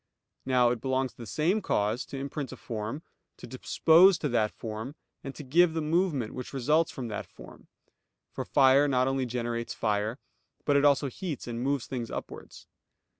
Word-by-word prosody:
Now 125 -2 +4
it 120 -3 -3
belongs 130 -1 0
to - - -32
the 115 - -9
same 170 - +1
cause, 110 - -1
to 140 - -7
imprint 140 0 -5
a - - -9
form, 115 +7 -5 0.3
to - - -10
dispose 165 +8 +4
to 150 -2 -2
that 110 -3 +2
form, 110 +5 -7 0.3
and 135 - -7
to 150 - -8
give 165 +5 +3
the 160 - 0
movement 155 - 0
which 125 +1 -7
results 150 +5 +2
from 125 -3 -6
that 105 - -5
form; - - -15 0.6
for - - -4
fire 140 +1 +4
not 130 -2 +2
only 135 -1 0
generates 120 -1 -3
fire, 105 +2 -1 0.5
but 145 - +2
it 140 +1 +4
also 140 0 +4
heats 150 +2 -5
and 120 0 -4
moves 135 -1 0
things 120 -3 -5
upwards. - - -8
130 Hz, 180 wpm, -28 LUFS, 120-150 Hz, 0.6 s, Now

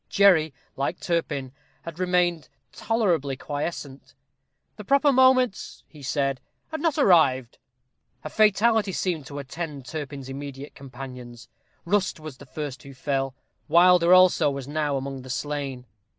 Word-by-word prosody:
Jerry, 180 -6 +4 0.2
like 135 - -2
Turpin, 150 -6 -2 0.3
had 165 0 -9
remained 180 -2 +1 0.2
tolerably 175 - 0
quiescent. 145 -3 -6 0.6
"The 210 - -9
proper 280 +6 +3
moment," 260 -4 +2
he 150 - -15
said, 135 -1 -1 0.3
"had 315 -2 -5
not 320 -2 0
arrived." 140 - +3 0.6
A 155 - -5
fatality 215 -1 +3
seemed 170 -8 -2
to 145 - -8
attend 145 0 -6
Turpin's 140 -3 -6
immediate 140 +1 -8
companions. 125 -3 -10 0.4
Rust 190 -1 0
was 155 -4 -9
the 140 - -14
first 140 -2 -6
who 140 -1 -12
fell; 135 -1 -2 0.3
Wilder 175 0 +5
also 185 -4 +6
was 140 -2 -5
now 145 -1 -1
among 135 0 -5
the 130 - -12
slain. 140 -2 -4
150 Hz, 135 wpm, -25 LUFS, 135-185 Hz, 0.6 s, also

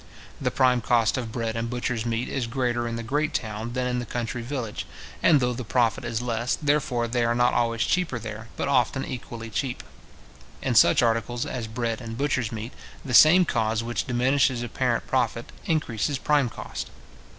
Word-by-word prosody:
The - - +1
prime 125 -1 +3
cost 115 -1 +2
of 120 -4 -3
bread 115 -1 -2
and 115 0 -2
butchers' 120 -1 -2
meat 115 +1 -1
is 125 -4 -2
greater 120 -1 -1
in 115 - -3
the 115 - -4
great 145 +6 -1
town 110 +1 -3
than 125 0 -1
in 125 0 0
the 120 - -4
country 120 0 -3
village; 120 -3 -4 0.3
and 155 -4 +5
though 125 -1 +1
the 125 +1 -5
profit 120 +1 +1
is 115 -1 -2
less, 120 0 0
therefore 140 -5 +1
they 120 +1 0
are 115 0 +1
not 120 0 +3
always 115 -1 +1
cheaper 180 -9 0
there, 110 0 -7
but - - -1
often 135 0 +2
equally 115 -2 -7
cheap. 125 +3 -2 0.8
In - - -1
such - - +6
articles 115 +1 0
as 120 -3 -4
bread 115 +1 -3
and 115 -1 -6
butchers' 130 -5 0
meat, 110 +2 -6 0.3
the 130 - -4
same 160 - +8
cause 110 -5 0
which 120 +1 -2
diminishes 125 0 +2
apparent 120 - -1
profit, - - -1 0.2
increases 145 -4 0
prime 145 -2 +2
cost. - - -6
120 Hz, 185 wpm, -25 LUFS, 115-130 Hz, 0.8 s, same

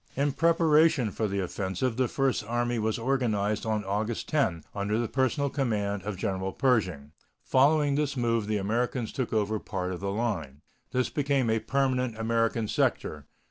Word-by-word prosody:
In 140 +2 +1
preparation 160 -5 +3
for 110 - -1
the 100 0 -1
offensive 95 +6 -2
the 130 0 +1
First 135 -5 0
Army 120 0 0
was 110 0 0
organized 115 -4 0
on 105 -2 -1
August 105 +4 -2
10, 95 - +1
under 105 +1 -1
the 120 0 0
personal 135 +2 0
command 105 -7 -1
of 100 0 -5
General 95 0 -2
Pershing. 95 - 0 0.3
Following 145 +2 +3
this 145 -1 0
move 115 -3 +1
the 105 -1 0
Americans 115 +4 -1
took 130 -3 -2
over 110 -1 0
part 95 -2 -4
of 90 - -5
the 100 - -3
line. 100 - -3 0.3
This 125 0 0
became 140 -5 +1
a 110 - +2
permanent 130 -3 0
American 115 0 0
sector. 75 -7 -1
115 Hz, 165 wpm, -28 LUFS, 100-130 Hz, 0.3 s, preparation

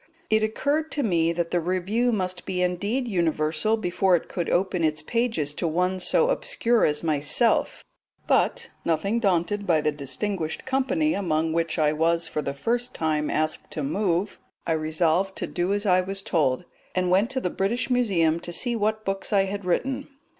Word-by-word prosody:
It 220 0 +4
occurred 285 +8 0
to 290 - -1
me 170 -6 +2
that 170 0 -2
the 175 - +2
Review 185 +8 0
must 185 -4 -2
be 180 -1 0
indeed 205 +8 -1
universal 170 +1 +1
before 185 -1 +2
it 170 - -2
could 175 -3 -3
open 180 -1 +1
its 155 -1 0
pages 225 -10 -1
to 170 - -2
one 180 +3 0
so 475 - +3
obscure 240 - +2
as 150 +1 0
myself; 155 - +1 0.4
but, - - +1
nothing 195 +8 0
daunted 200 0 0
by 165 -3 +4
the 150 0 +1
distinguished 155 +5 -3
company 270 +4 +1
among 160 - 0
which 165 -1 -1
I 150 -1 +3
was 165 +2 +1
for 150 - -2
the 140 -1 -4
first 240 - -2
time 155 -2 0
asked 155 0 -1
to 150 - -3
move, 185 +5 -1 0.3
I - - -1
resolved 160 +4 +1
to - - -3
do 180 +2 -2
as 205 +1 0
I 185 -2 +4
was 195 +1 -4
told, 155 -3 +1 0.3
and 180 -1 +1
went 195 +5 +3
to 270 -1 -1
the 180 -8 -2
British 235 +7 -1
Museum 180 -10 +2
to 175 - -6
see 240 +7 -1
what 215 0 -1
books 195 +2 -2
I 200 -2 +4
had 195 0 -4
written. 265 +10 -1
185 Hz, 180 wpm, -25 LUFS, 160-215 Hz, 0.4 s, It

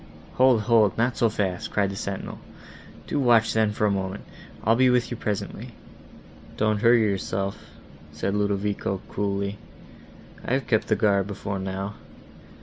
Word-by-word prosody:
"Hold, 130 -3 +5
hold, 110 -3 +3
not 120 +2 +1
so 115 - +2
fast," 95 -4 -2
cried 100 -2 0
the - - -6
sentinel, 100 0 -5 0.7
"do 145 - -2
watch 120 -4 +4
then, 110 -1 +2
for 105 0 0
a 105 - +3
moment: 95 0 -3 0.4
I'll 115 +2 +4
be 130 +1 +4
with 125 -1 +2
you - - -2
presently." 105 -3 -4 0.8
"Don't 110 -1 +1
hurry 115 0 +5
yourself," 100 -1 -2 0.5
said 75 +6 -2
Ludovico, 100 -1 -1
coolly, 100 0 -2 0.8
"I - - -2
have 135 -2 0
kept 110 -1 +1
guard 100 -3 +2
before 100 -1 -4
now. 95 +1 -4
105 Hz, 145 wpm, -25 LUFS, 100-115 Hz, 0.8 s, Hold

